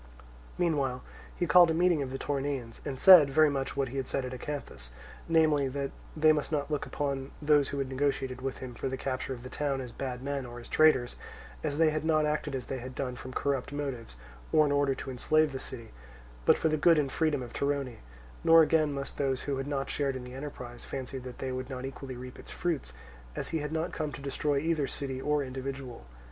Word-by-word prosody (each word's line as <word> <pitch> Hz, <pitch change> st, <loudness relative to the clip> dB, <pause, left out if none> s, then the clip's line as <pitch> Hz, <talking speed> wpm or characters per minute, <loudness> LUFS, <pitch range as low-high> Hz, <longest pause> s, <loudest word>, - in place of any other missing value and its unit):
Meanwhile 140 Hz, -7 st, 0 dB, 0.3 s
he 175 Hz, -, 0 dB
called 175 Hz, +2 st, +7 dB
a 160 Hz, -, +1 dB
meeting 175 Hz, -2 st, +3 dB
of 135 Hz, -, -3 dB
the 135 Hz, -, -4 dB
Toronaeans, 135 Hz, -4 st, -3 dB
and 130 Hz, -2 st, -4 dB
said 180 Hz, -7 st, +9 dB
very 155 Hz, +2 st, +5 dB
much 135 Hz, 0 st, -3 dB
what 135 Hz, -2 st, 0 dB
he 135 Hz, -, -6 dB
had 135 Hz, -, -2 dB
said 135 Hz, -, -1 dB
at 125 Hz, -, -5 dB
Acanthus, 125 Hz, -, -6 dB, 0.4 s
namely, 155 Hz, -4 st, +4 dB
that 140 Hz, +1 st, -3 dB, 0.3 s
they 155 Hz, 0 st, +6 dB
must 150 Hz, 0 st, -2 dB
not 150 Hz, 0 st, -1 dB
look 150 Hz, -, -1 dB
upon 140 Hz, -2 st, -2 dB
those 145 Hz, -2 st, +3 dB
who 140 Hz, -, -4 dB
had 135 Hz, -1 st, -1 dB
negotiated 130 Hz, -1 st, -1 dB
with 135 Hz, 0 st, -3 dB
him 125 Hz, -, -8 dB
for 120 Hz, -, -3 dB
the 130 Hz, -, -3 dB
capture 130 Hz, 0 st, -3 dB
of 120 Hz, -2 st, -6 dB
the -, -, -6 dB
town 140 Hz, -1 st, -1 dB
as 125 Hz, -2 st, -6 dB
bad 125 Hz, 0 st, -5 dB
men 140 Hz, -1 st, -2 dB
or 120 Hz, -1 st, -8 dB
as 120 Hz, -, -11 dB
traitors, 150 Hz, -6 st, +4 dB, 0.5 s
as 145 Hz, -, -1 dB
they 160 Hz, -1 st, +4 dB
had 155 Hz, 0 st, -2 dB
not 155 Hz, -1 st, +3 dB
acted 150 Hz, -2 st, -1 dB
as 125 Hz, -2 st, -4 dB
they 135 Hz, -, -4 dB
had 130 Hz, +1 st, -8 dB
done 125 Hz, -2 st, -3 dB
from 130 Hz, +2 st, -8 dB
corrupt 140 Hz, 0 st, -1 dB
motives 135 Hz, -, -4 dB, 0.4 s
or 155 Hz, -, +5 dB
in 145 Hz, -, 0 dB
order 140 Hz, -1 st, +2 dB
to 135 Hz, -, -6 dB
enslave 155 Hz, +4 st, +2 dB
the 135 Hz, -, -4 dB
city, 115 Hz, -3 st, -9 dB, 0.5 s
but -, -, +6 dB
for -, -, +1 dB
the 155 Hz, -, +1 dB
good 165 Hz, +2 st, +5 dB
and 140 Hz, -3 st, +1 dB
freedom 150 Hz, -4 st, +1 dB
of 120 Hz, -, -9 dB
Torone; 140 Hz, -4 st, -1 dB, 0.5 s
nor 165 Hz, 0 st, +8 dB
again 155 Hz, -1 st, +3 dB
must 140 Hz, -1 st, -5 dB
those 135 Hz, -2 st, 0 dB
who 140 Hz, -2 st, -2 dB
had 135 Hz, +1 st, -3 dB
not 140 Hz, -1 st, -2 dB
shared 140 Hz, -2 st, -1 dB
in 130 Hz, -, -5 dB
the 125 Hz, 0 st, -9 dB
enterprise 130 Hz, -3 st, -7 dB
fancy 130 Hz, 0 st, -5 dB
that 125 Hz, -1 st, -9 dB
they 130 Hz, -, -3 dB
would 130 Hz, +1 st, -4 dB
not 130 Hz, -1 st, -5 dB
equally 135 Hz, -1 st, -7 dB
reap 125 Hz, +1 st, -9 dB
its -, -, -11 dB
fruits, 160 Hz, -, -2 dB, 0.4 s
as -, -, -4 dB
he 160 Hz, -, -1 dB
had 150 Hz, 0 st, -4 dB
not 160 Hz, +2 st, -1 dB
come 155 Hz, -2 st, -2 dB
to -, -, -7 dB
destroy 140 Hz, +1 st, -1 dB
either 155 Hz, -1 st, +1 dB
city 135 Hz, -1 st, -4 dB
or 150 Hz, 0 st, +1 dB
individual. 130 Hz, -, -6 dB
140 Hz, 230 wpm, -30 LUFS, 130-150 Hz, 0.5 s, said